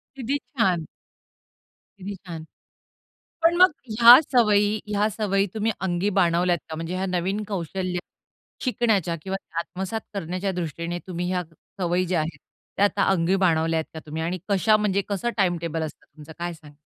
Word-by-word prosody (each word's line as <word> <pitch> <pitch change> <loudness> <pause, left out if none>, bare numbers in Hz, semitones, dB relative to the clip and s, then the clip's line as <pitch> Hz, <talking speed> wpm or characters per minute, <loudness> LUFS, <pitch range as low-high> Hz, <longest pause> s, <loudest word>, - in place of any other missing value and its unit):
किती 270 +2 -1
छान! 190 - 0 1.1
किती 200 +2 -6
छान. 170 -4 -8 1.0
पण 335 +1 +4
मग 370 +1 +7 0.3
ह्या 240 +3 +11
सवयी 210 -3 +3
ह्या 210 0 +1
सवयी 195 -2 0
तुम्ही 220 +1 0
अंगी 185 +2 0
बाणवल्यात 175 0 +3
का? 160 - -5
म्हणजे 165 +2 -4
ह्या 190 +1 -1
नवीन 185 +3 -1
कौशल्य 185 -1 -3 0.7
शिकण्याच्या 220 - +1
किंवा 190 +2 -3 0.2
आत्मसात 190 +5 -4
करण्याच्या 185 +1 -2
दृष्टीने 170 0 -4
तुम्ही 180 -1 -3
ह्या 180 -1 0 0.4
सवयी 180 +1 +1
ज्या 175 -2 +1
आहेत, 155 +2 -4 0.4
त्या 200 - +4
आता 205 0 +2
अंगी 185 0 +2
बाणवल्यात 160 -1 +1
का 160 - -6
तुम्ही 155 +2 -4
आणि 175 +3 -2
कशा 205 +2 +4
म्हणजे 200 -2 +1
कसं 205 +4 -1
टाईमटेबल 170 -4 0
असतं 155 - -7
तुमचं, 155 +1 -11
काय 175 0 -3
सांगाल? 150 -3 -14
185 Hz, 155 wpm, -24 LUFS, 170-205 Hz, 1.1 s, ह्या